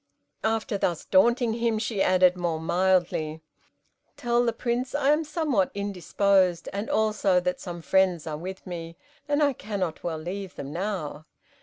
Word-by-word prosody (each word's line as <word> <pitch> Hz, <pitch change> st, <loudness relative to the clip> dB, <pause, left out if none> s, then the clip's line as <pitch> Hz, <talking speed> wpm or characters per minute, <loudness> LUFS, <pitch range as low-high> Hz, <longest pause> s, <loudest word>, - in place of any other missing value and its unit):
After 220 Hz, -1 st, 0 dB
thus 170 Hz, -4 st, -1 dB
daunting 235 Hz, +4 st, +3 dB
him, 230 Hz, -1 st, 0 dB
she 215 Hz, -2 st, -2 dB
added, 185 Hz, -1 st, +4 dB
more 170 Hz, -3 st, -2 dB
mildly, 170 Hz, -2 st, +1 dB, 0.8 s
"Tell 240 Hz, 0 st, +1 dB
the 235 Hz, -, +2 dB
Prince 240 Hz, +3 st, -2 dB
I 285 Hz, 0 st, +3 dB
am 305 Hz, +2 st, +2 dB
somewhat 295 Hz, -, 0 dB
indisposed, 195 Hz, -2 st, +1 dB
and 200 Hz, +2 st, -3 dB
also 210 Hz, -4 st, +2 dB
that 180 Hz, 0 st, -2 dB
some 175 Hz, -3 st, -7 dB
friends 185 Hz, -4 st, +2 dB
are 155 Hz, -2 st, -3 dB
with 185 Hz, +5 st, -7 dB
me, 170 Hz, -2 st, -7 dB, 0.3 s
and 290 Hz, +1 st, +2 dB
I 285 Hz, -1 st, +3 dB
cannot 200 Hz, -8 st, -4 dB
well 165 Hz, -2 st, -2 dB
leave 185 Hz, +4 st, -6 dB
them 140 Hz, +1 st, -7 dB
now." 170 Hz, -5 st, -4 dB
190 Hz, 155 wpm, -26 LUFS, 175-225 Hz, 0.8 s, added